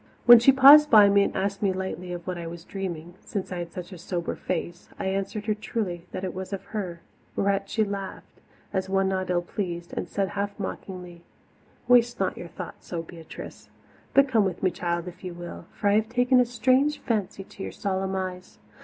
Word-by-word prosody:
When 240 -1 +11
she 240 +4 +7
paused 280 +3 +9
by 210 -4 +8
me 200 0 +5
and - - 0
asked 195 0 -1
me 200 -2 +2
lightly 185 -1 -4
of 175 -1 -6
what 180 - -3
I 170 -1 -6
was 165 0 -8
dreaming, 175 -4 -6
since 195 -2 -4
I 180 - -3
had 170 -1 -5
such 180 +1 -8
a 180 - -10
sober 175 -1 -3
face, 175 0 -4
I - - -4
answered 195 +2 -2
her 215 - +1
truly 195 -5 -4
that 185 - -5
it 185 - -3
was 190 +1 -6
of 195 - -4
her 180 -6 -4 0.3
whereat 195 0 0
she 220 - +1
laughed, 200 -2 -6 0.3
as 190 0 -1
one 195 0 +2
not 185 -1 -2
ill 175 -1 +1
pleased, 175 -2 -5
and - - -4
said 195 -1 -1
half 200 +1 -3
mockingly: 180 -3 -6 0.7
"Waste 240 -1 +4
not 190 -1 0
your 175 - -8
thoughts - - -9
so, - - -5
little 165 - -15
Beatrice. 165 -2 -10 0.5
But 275 0 +6
come 230 -5 +3
with 190 -2 -3
me, 185 - +3
child, 170 0 -2
if 180 +1 -10
you 180 -2 -6
will, 175 0 -8
for 205 - -2
I - - +4
have 220 0 0
taken 250 +1 +3
a 250 - +5
strange 260 +5 +2
fancy 210 -5 -2
to 195 - -13
your - - -4
solemn 190 -1 -2
eyes. 185 -1 -5
190 Hz, 215 wpm, -26 LUFS, 180-210 Hz, 0.7 s, When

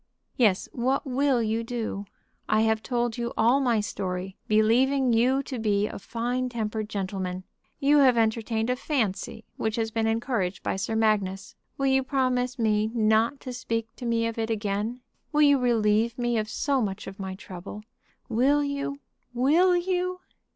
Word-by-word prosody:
"Yes; 210 -7 +2
what 260 +4 0
will 265 -2 +1
you 220 +1 -1
do? 230 -4 -4 0.4
I 215 0 +3
have 220 0 +2
told 240 -1 -1
you 235 0 -3
all 240 +5 +4
my 245 -5 +2
story, 190 -2 -4
believing 245 +4 +3
you 255 +4 +3
to 255 -3 -5
be 205 -2 +1
a - - -6
fine 245 +4 -2
tempered 220 -2 -3
gentleman. 190 -3 -3 0.4
You 285 +2 +4
have 260 -4 +5
entertained 225 +1 +1
a - - +1
fancy 225 -4 -2
which 220 -1 -1
has 225 -1 -1
been 225 0 0
encouraged 225 -5 -1
by - - -1
Sir 220 +3 -2
Magnus. 200 -3 0 0.2
Will 275 - -1
you 265 0 +3
promise 255 -1 0
me 215 -2 +1
not 225 +4 +2
to 255 - -6
speak 230 -2 -3
to 245 - -5
me 230 0 +1
of 230 0 -3
it 225 0 -1
again? 215 +2 -2 0.3
Will 300 0 +4
you 285 -2 +5
relieve 230 -1 +2
me 240 -2 0
of 215 0 -3
so 275 +3 0
much 195 -3 -3
of 195 +1 -9
my 190 -1 -4
trouble? 190 +3 -9 0.4
Will 270 +5 +3
you; 280 0 -3 0.3
will 325 +9 +4
you?" 365 0 -1
230 Hz, 170 wpm, -26 LUFS, 215-255 Hz, 0.4 s, have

